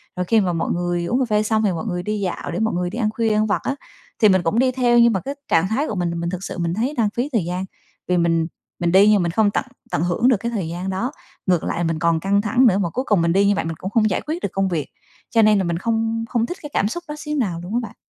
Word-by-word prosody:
Rồi 180 Hz, -, -2 dB
khi 225 Hz, +5 st, +3 dB
mà 180 Hz, -3 st, 0 dB
mọi 165 Hz, -, -1 dB
người 175 Hz, 0 st, -1 dB
uống 245 Hz, +8 st, 0 dB
cà 260 Hz, -, +2 dB
phê 210 Hz, 0 st, +2 dB
xong 220 Hz, 0 st, +1 dB
thì 200 Hz, -, +2 dB
mọi 170 Hz, +4 st, -4 dB
người 180 Hz, -4 st, -3 dB
đi 210 Hz, +1 st, -2 dB
dạo 185 Hz, -3 st, -3 dB
để 175 Hz, -, -3 dB
mọi 220 Hz, 0 st, 0 dB
người 175 Hz, 0 st, -1 dB
đi 210 Hz, -, -7 dB
ăn 215 Hz, -2 st, +1 dB
khuya, 225 Hz, 0 st, 0 dB
ăn 215 Hz, 0 st, +2 dB
vặt 210 Hz, -, 0 dB
á, 275 Hz, -, -1 dB, 0.4 s
thì 215 Hz, -, +6 dB
mình 185 Hz, -2 st, +3 dB
cũng 205 Hz, +8 st, +1 dB
đi 255 Hz, 0 st, +3 dB
theo, 245 Hz, -2 st, +3 dB
nhưng 235 Hz, -1 st, +5 dB
mà 190 Hz, -, 0 dB
cái 280 Hz, +1 st, -5 dB
trạng 165 Hz, +2 st, +3 dB
thái 260 Hz, +9 st, 0 dB
của 215 Hz, -, -3 dB
mình 175 Hz, -2 st, -1 dB
là 170 Hz, -, -4 dB
mình 170 Hz, 0 st, -2 dB
thực 185 Hz, +1 st, -5 dB
sự -, -, -6 dB
mình 170 Hz, -1 st, -1 dB
thấy 240 Hz, +9 st, -1 dB
đang 220 Hz, -3 st, +2 dB
phí 245 Hz, +4 st, -1 dB
thời 215 Hz, -8 st, +1 dB
gian. 180 Hz, +2 st, -3 dB, 0.4 s
Vì 180 Hz, -, +2 dB
mình 165 Hz, -1 st, +2 dB, 0.3 s
mình 175 Hz, -1 st, +1 dB
đi 195 Hz, +3 st, +6 dB
nhưng 205 Hz, -4 st, +4 dB
mình 170 Hz, -, -1 dB
không 205 Hz, +2 st, +2 dB
tận 265 Hz, -, -1 dB, 0.3 s
tận 155 Hz, -, 0 dB
hưởng 180 Hz, +8 st, +1 dB
được 250 Hz, -5 st, +4 dB
cái 235 Hz, +4 st, -4 dB
thời 200 Hz, -8 st, -2 dB
gian 175 Hz, +3 st, -4 dB
đó, 190 Hz, +8 st, -2 dB, 0.4 s
ngược 180 Hz, -3 st, +2 dB
lại 175 Hz, -, -2 dB
mình 165 Hz, -1 st, -1 dB
còn 170 Hz, -1 st, +2 dB
căng 200 Hz, +4 st, +1 dB
thẳng 245 Hz, +5 st, +3 dB
nữa, 195 Hz, -4 st, +3 dB
mà 185 Hz, -4 st, 0 dB
cuối 255 Hz, +10 st, -3 dB
cùng 205 Hz, -6 st, +3 dB
mình 170 Hz, 0 st, +2 dB
đi 195 Hz, +2 st, +4 dB
như 205 Hz, -, +3 dB
vậy -, -, -2 dB
mình 165 Hz, -, -3 dB
cũng 190 Hz, -, -5 dB
không 215 Hz, 0 st, +2 dB
giải 185 Hz, -, -1 dB
quyết 330 Hz, +3 st, -3 dB
được -, -, 0 dB
công 195 Hz, 0 st, +1 dB
việc. 160 Hz, -5 st, -2 dB, 0.4 s
Cho 225 Hz, -, +4 dB
nên 215 Hz, -1 st, +5 dB
là 195 Hz, -, +1 dB
mình 170 Hz, -1 st, -1 dB
không 225 Hz, +2 st, -1 dB
không 230 Hz, -2 st, +1 dB
thích 355 Hz, -, -6 dB
cái 295 Hz, -, -7 dB
cảm 205 Hz, -, +2 dB
xúc 345 Hz, +10 st, -5 dB
đó 300 Hz, -, -5 dB
xíu 300 Hz, 0 st, -4 dB
nào 185 Hz, -10 st, -1 dB
luôn 180 Hz, +4 st, -6 dB
á -, -, +3 dB
bạn. -, -, -8 dB
200 Hz, 325 wpm, -21 LUFS, 175-230 Hz, 0.4 s, thì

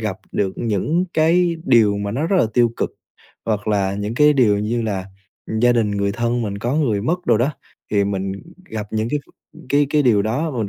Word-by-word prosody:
gặp 105 Hz, -4 st, -3 dB, 0.2 s
được 95 Hz, -2 st, -1 dB
những 120 Hz, -, 0 dB
cái 170 Hz, +2 st, +3 dB
điều 110 Hz, -5 st, +4 dB
mà 100 Hz, 0 st, -3 dB
nó 140 Hz, +8 st, -1 dB
rất 190 Hz, -, +1 dB
là -, -, +3 dB
tiêu 120 Hz, -2 st, +4 dB
cực -, -, -1 dB, 0.6 s
hoặc 105 Hz, -1 st, -1 dB
là 100 Hz, -2 st, +1 dB
những 105 Hz, +3 st, -3 dB
cái 150 Hz, +3 st, +5 dB
điều 115 Hz, -8 st, +3 dB
như 115 Hz, +3 st, -1 dB
là 100 Hz, -4 st, -3 dB, 0.6 s
gia 120 Hz, 0 st, +5 dB
đình, 115 Hz, -3 st, +1 dB
người 100 Hz, 0 st, 0 dB
thân 120 Hz, +2 st, -1 dB
mình 100 Hz, -2 st, -4 dB
có 120 Hz, +6 st, -2 dB
người 115 Hz, -10 st, +1 dB
mất 175 Hz, +8 st, -2 dB
đồ 115 Hz, -3 st, +4 dB
đó, 125 Hz, +6 st, +1 dB, 0.4 s
thì 100 Hz, -1 st, +2 dB
mình 95 Hz, -1 st, -2 dB, 0.4 s
gặp 110 Hz, -1 st, -4 dB
những 110 Hz, +1 st, -1 dB
cái 150 Hz, -, 0 dB
v -, -, -22 dB, 0.4 s
cái 145 Hz, 0 st, +3 dB
cái 150 Hz, 0 st, +3 dB
điều 110 Hz, -6 st, +3 dB
đó 130 Hz, +10 st, -1 dB
và 130 Hz, -, -5 dB
mình 110 Hz, -3 st, -1 dB
115 Hz, 225 wpm, -20 LUFS, 100-140 Hz, 0.6 s, cái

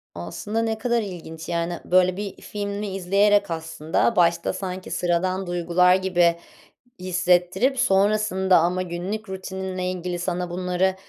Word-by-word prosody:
Aslında 150 Hz, -, -3 dB
ne 225 Hz, -1 st, -1 dB
kadar 235 Hz, +1 st, 0 dB
ilginç, 170 Hz, -5 st, -8 dB
yani, 170 Hz, 0 st, -2 dB
böyle 185 Hz, 0 st, +3 dB
bir 205 Hz, -1 st, -6 dB
filmi 205 Hz, 0 st, -4 dB
izleyerek 200 Hz, +1 st, +3 dB
aslında 160 Hz, +6 st, -1 dB
başta 170 Hz, -2 st, +2 dB
sanki 185 Hz, -1 st, -6 dB
sıradan 185 Hz, +2 st, 0 dB
duygular 175 Hz, +1 st, +3 dB
gibi 175 Hz, -3 st, +2 dB, 0.6 s
hissettirip, 180 Hz, +7 st, +1 dB
sonrasında 195 Hz, -2 st, +3 dB
ama 175 Hz, +2 st, +1 dB
günlük 185 Hz, +5 st, -4 dB
rutininle 190 Hz, -1 st, -4 dB
ilgili 180 Hz, -1 st, -4 dB
sana 180 Hz, 0 st, -2 dB
bunları 180 Hz, +1 st, 0 dB
185 Hz, 125 wpm, -23 LUFS, 175-195 Hz, 0.6 s, böyle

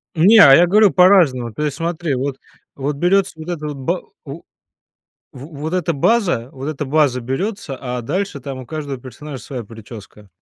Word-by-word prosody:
Не, 200 Hz, +8 st, +6 dB
а 135 Hz, -8 st, +9 dB
я 175 Hz, +1 st, +5 dB
говорю 210 Hz, +1 st, +5 dB
по-разному, 165 Hz, -, +4 dB
то 150 Hz, -, -4 dB
есть, 145 Hz, -1 st, -2 dB
смотри: 165 Hz, -3 st, -2 dB
вот, 135 Hz, +1 st, -3 dB, 0.4 s
вот 140 Hz, +1 st, -3 dB
берётся 190 Hz, +4 st, +2 dB
вот 160 Hz, -, -9 dB
эта 150 Hz, -3 st, -4 dB
ба 140 Hz, +7 st, -3 dB, 0.2 s
у 145 Hz, +4 st, -8 dB, 0.9 s
В 130 Hz, +2 st, -10 dB
вот 155 Hz, +4 st, -5 dB
эта 175 Hz, -2 st, 0 dB
база, 170 Hz, -, +1 dB
вот 135 Hz, +2 st, -7 dB
эта 150 Hz, -1 st, -4 dB
база 140 Hz, -3 st, +1 dB
берётся, 140 Hz, -, -4 dB
а 125 Hz, -2 st, -4 dB
дальше 170 Hz, +4 st, -3 dB
там 130 Hz, 0 st, -7 dB
у 130 Hz, -, -9 dB
каждого 145 Hz, -4 st, -5 dB
персонажа 130 Hz, +2 st, -9 dB
своя 125 Hz, -4 st, -6 dB
причёска. 105 Hz, -1 st, -13 dB
145 Hz, 180 wpm, -19 LUFS, 130-175 Hz, 0.9 s, а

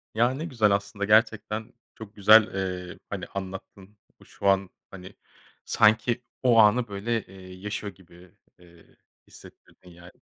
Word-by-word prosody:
Ya, 120 Hz, +3 st, +2 dB
ne 155 Hz, +5 st, -5 dB
güzel 115 Hz, -10 st, +1 dB
aslında, 100 Hz, 0 st, -2 dB
gerçekten, 110 Hz, 0 st, +1 dB, 0.2 s
çok 110 Hz, -1 st, -12 dB
güzel, 105 Hz, +1 st, +6 dB
eee, 90 Hz, -2 st, -5 dB
hani, -, -, -5 dB
anlattın. 95 Hz, +1 st, -9 dB, 0.3 s
Şu 100 Hz, -, -6 dB
an, 95 Hz, -1 st, +2 dB, 0.2 s
hani, 95 Hz, +1 st, -12 dB, 0.5 s
sanki 115 Hz, +3 st, +2 dB, 0.2 s
o 120 Hz, -2 st, +4 dB
anı 115 Hz, +3 st, +4 dB
böyle, 105 Hz, +3 st, -3 dB
eee, 95 Hz, -1 st, -13 dB
yaşıyor 105 Hz, +1 st, -6 dB
gibi, 90 Hz, -1 st, -19 dB, 0.3 s
eee, 85 Hz, -1 st, -21 dB, 0.3 s
hissettirdin 90 Hz, -, -18 dB
yani. 85 Hz, +1 st, -15 dB
100 Hz, 135 wpm, -26 LUFS, 95-110 Hz, 0.5 s, güzel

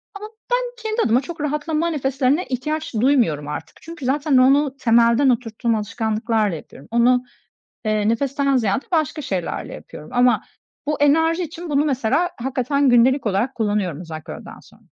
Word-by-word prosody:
Ama 420 Hz, +1 st, -7 dB, 0.2 s
ben -, -, +3 dB, 0.2 s
kendi 440 Hz, +1 st, -1 dB
adıma 235 Hz, +3 st, +3 dB
çok 330 Hz, 0 st, -8 dB
rahatlama 305 Hz, +2 st, -1 dB
nefeslerine 275 Hz, +1 st, 0 dB
ihtiyaç 300 Hz, +4 st, -3 dB
duymuyorum 220 Hz, -, +2 dB
artık. 150 Hz, -, -7 dB
Çünkü 330 Hz, -4 st, -9 dB
zaten 280 Hz, +1 st, +2 dB
onu 275 Hz, +2 st, +4 dB
temelden 235 Hz, +2 st, +4 dB
oturttuğum 230 Hz, -1 st, 0 dB
alışkanlıklarla 215 Hz, -1 st, -1 dB
yapıyorum. 145 Hz, -2 st, -12 dB
Onu, 245 Hz, +2 st, +3 dB, 0.6 s
eee, 215 Hz, -1 st, +1 dB
nefesten 275 Hz, +3 st, +1 dB
ziyade 220 Hz, +1 st, 0 dB
başka 310 Hz, -1 st, 0 dB
şeylerle 185 Hz, -9 st, -4 dB
yapıyorum 150 Hz, -, -11 dB
ama 245 Hz, 0 st, +3 dB, 0.4 s
bu 300 Hz, 0 st, -2 dB
enerji 325 Hz, +4 st, +3 dB
için 340 Hz, 0 st, -7 dB
bunu 290 Hz, 0 st, +2 dB
mesela 280 Hz, +5 st, +1 dB
hakikaten 265 Hz, +2 st, 0 dB
gündelik 245 Hz, +1 st, +4 dB
olarak 210 Hz, +7 st, 0 dB
kullanıyorum 205 Hz, -8 st, -1 dB
özellikle 160 Hz, -3 st, -8 dB
öğleden -, -, -10 dB
sonra. -, -, -21 dB
255 Hz, 150 wpm, -21 LUFS, 225-295 Hz, 0.6 s, onu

